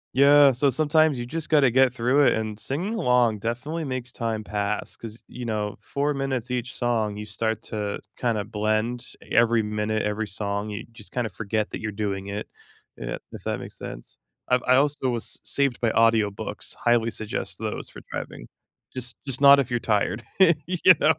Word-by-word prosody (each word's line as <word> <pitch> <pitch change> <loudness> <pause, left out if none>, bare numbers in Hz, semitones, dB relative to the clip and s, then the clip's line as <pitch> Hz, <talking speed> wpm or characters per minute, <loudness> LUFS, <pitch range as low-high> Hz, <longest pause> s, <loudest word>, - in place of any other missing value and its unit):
Yeah, 140 0 +7
so 135 +3 +2
sometimes 155 +1 +3
you 120 - -3
just 160 +4 -4
gotta 145 -5 +4
get 130 0 +4
through 125 +4 +3
it, - - +5
and 110 -1 -3
singing 180 - -3
along 125 - +3
definitely 130 +9 -3
makes 130 -2 -4
time 115 -4 -3
pass 105 0 -3
'cause, 115 0 -10
you 125 -1 -7
know, 105 -2 -2
4 145 +1 -1
minutes 130 -3 -2
each 125 0 -3
song, 110 -4 0
you 105 0 -6
start 110 +2 -2
to, 105 -2 -4 0.2
kinda 115 -4 0
blend 110 +3 -1
every 115 -1 +3
minute, 105 +1 -1
every 105 +1 -1
song. 100 +1 -3
You 105 +1 -5
just, 110 -2 -12
kinda 120 -3 -1
forget 105 +3 -2
that - - -5
you're 110 -2 -4
doing 100 -2 -3
it, 100 +1 -5 0.5
yeah, - - -4
if - - -9
that - - -1
makes - - -10
sense. - - -9 0.3
I've 125 0 +3
I 130 - +4
also 140 -1 +2
was 120 -2 -4
saved 140 -3 0
by 115 -2 +1
audiobooks. 115 -3 +1
Highly 120 -1 +3
suggest 110 0 -5
those - - -4
for - - -11
driving. - - -6 0.4
Just 125 -1 -7
just 135 -1 -4
not 140 0 +8
if 130 -2 -1
you're 120 - +1
tired, 105 0 0 0.4
you 180 0 +6
know? 160 - +5
115 Hz, 185 wpm, -25 LUFS, 105-130 Hz, 0.5 s, not